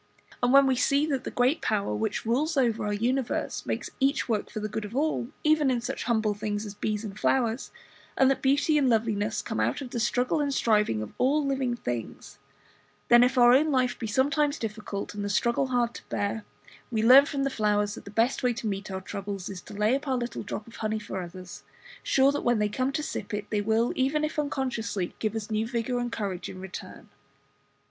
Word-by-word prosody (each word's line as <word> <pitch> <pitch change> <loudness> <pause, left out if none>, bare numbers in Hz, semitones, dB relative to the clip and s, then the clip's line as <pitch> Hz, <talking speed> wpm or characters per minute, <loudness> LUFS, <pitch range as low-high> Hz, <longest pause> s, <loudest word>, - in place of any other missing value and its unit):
And 245 0 +3
when 275 +1 +7
we 265 -1 +3
see 280 +4 +2
that 275 -4 -2
the - - -2
Great 255 +6 +1
Power 200 - 0
which 105 - -2
rules 285 +7 0
over 230 -5 +1
our - - -1
universe 245 +4 -1
makes - - -3
each 275 +2 +1
work 220 -4 -1
for - - -5
the 215 - -2
good 215 +1 -4
of 210 +3 -7
all, 290 -4 0 0.2
even 305 -2 +3
in 250 -2 +1
such 245 +3 -4
humble 220 -3 +1
things 205 +1 -3
as 205 - -7
bees 210 +1 -2
and 205 0 -7
flowers; 240 -2 +1 0.5
and 265 - +5
that 270 - -1
beauty 285 +3 +3
and 270 -3 +3
loveliness 220 -2 0
come - - -3
out 115 +3 +1
of 255 -3 -7
the 240 - -2
struggle 245 +5 +1
and 285 -2 0
striving 210 - +2
of 105 - -9
all 285 +3 +2
living 265 -3 0
things; 120 - -6 0.7
then, 240 0 +8
if 255 +1 +1
our 240 0 +7
own 300 +4 +4
life 255 -2 +1
be 225 - -3
sometimes 285 +6 +1
difficult, 215 -2 -5
and 205 0 -4
the 205 - -2
struggle 235 +6 +1
hard 240 -2 0
to - - -12
bear, 205 +1 -2 0.4
we 220 -2 0
learn 265 +5 +8
from 280 -3 -2
the 275 - 0
flowers 210 -2 +1
that - - -9
the - - -10
best 230 +5 +1
way 250 -1 +2
to 235 0 -7
meet 200 -1 -3
our 190 0 -4
troubles 195 -1 -5
is 190 -2 -7
to - - -11
lay 210 +3 +2
up 285 +2 -4
our 260 -1 +1
little 240 0 -4
drop 210 +1 -5
of 230 - -13
honey 220 0 -1
for 205 -3 -5
others, 180 +1 -9 0.4
sure 270 +1 +3
that 285 - -2
when 240 -1 +2
they 210 0 +1
come 255 +5 -1
to 300 +2 -2
sip 210 -8 -4
it 210 0 -5
they 210 -1 +1
will, 220 +3 +1
even 275 +4 +1
if 305 0 -2
unconsciously, 250 -10 -2
give 215 0 -1
us 220 0 -4
new 215 +1 0
vigour 240 +1 -1
and 240 -1 -2
courage 195 -5 -4
in 185 - -8
return. 190 0 -9
235 Hz, 225 wpm, -27 LUFS, 210-265 Hz, 0.7 s, then